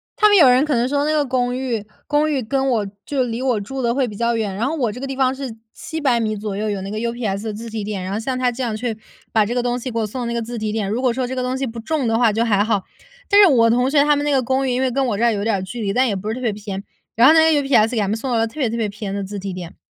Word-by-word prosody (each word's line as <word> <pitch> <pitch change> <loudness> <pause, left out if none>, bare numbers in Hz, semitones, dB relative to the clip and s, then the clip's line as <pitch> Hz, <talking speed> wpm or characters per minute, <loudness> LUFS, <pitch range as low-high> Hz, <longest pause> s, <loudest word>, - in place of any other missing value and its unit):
他 425 -4 +5
们 410 -1 +5
有 295 -7 +8
人 250 +2 +5
可 300 -2 0
能 240 +1 +1
说 285 +1 0
那 305 - +1
个 300 -2 +2
公 250 -1 0
寓， 240 -5 -2 0.2
公 300 +1 +1
寓 270 -3 0
跟 270 +3 0
我 220 -5 +1 0.2
就 275 -3 -1
离 235 0 -3
我 250 -5 +1
住 265 +6 -5
得 235 0 0
会 265 -3 +1
比 210 - -8
较 235 +2 0
远， 215 -3 -2
然 230 +6 -1
后 320 - -2
我 245 -8 0
这 245 - -8
个 275 - -4
地 270 - -4
方 260 -1 +2
是 265 -4 -6 0.2
700 285 -7 -1
米 215 -1 -1
左 205 -1 -4
右， 215 +1 -2
有 200 -2 -2
那 195 - -6
个 215 - -3
UPS 225 -3 -3
的 215 - -3
自 225 +3 -7
提 220 -2 -4
点， 205 -3 -4
然 185 +1 -4
后 210 - -1
像 255 +2 -2
它 250 -1 +1
这 245 +2 -6
样 225 -3 -2
去 230 -1 -3 0.4
把 220 -1 +4
这 235 +4 -3
个 245 - 0
东 245 0 0
西 255 - -5
给 230 - -5
我 220 - +1
送 245 +5 -5
到 - - -3
那 235 - -2
个 - - 0
自 235 0 -5
提 215 -1 -2
点， 215 -3 -2
如 225 +5 -1
果 255 -2 +2
说 255 +1 -2
这 260 +1 -4
个 255 - -1
东 255 +1 -2
西 270 - -1
不 230 -2 -6
重 280 +1 -1
的 225 0 +2
话 230 -3 +4
就 225 +3 0
还 205 -3 +3
好。 210 -3 0 0.5
但 405 0 +7
是 395 - +8
我 230 -6 +4
同 250 +2 +2
学 285 0 +4
他 295 0 +4
们 290 - -1
那 295 - 0
个 265 -2 +2
公 265 +2 0
寓 - - 0
因 250 +1 0
为 260 -1 +1
跟 275 +2 0
我 210 -4 -1
这 235 - -1
儿 235 - +4
有 200 0 -2
点 220 -2 +1
儿 190 - -2
距 230 +5 -6
离， 200 -2 -1
但 255 +1 +3
也 205 - -1
不 205 +3 -4
是 220 - -2
特 255 - -7
别 230 -4 0
偏。 200 -1 -6 0.3
然 235 +3 +6
后 310 - +8
那 320 0 +5
个 290 - +2
UPS 245 -5 +3
给 240 - -3
他 200 - 0
们 210 - 0
送 250 +3 -4
到 235 - +2
了 225 - +2
特 230 +7 -9
别 245 -5 +1
特 230 - -3
别 225 -2 0
偏 205 -1 -6
的 200 - -3
自 205 +1 -6
提 195 0 -5
点。 180 -2 -8
235 Hz, 395 characters per minute, -20 LUFS, 215-265 Hz, 0.5 s, 有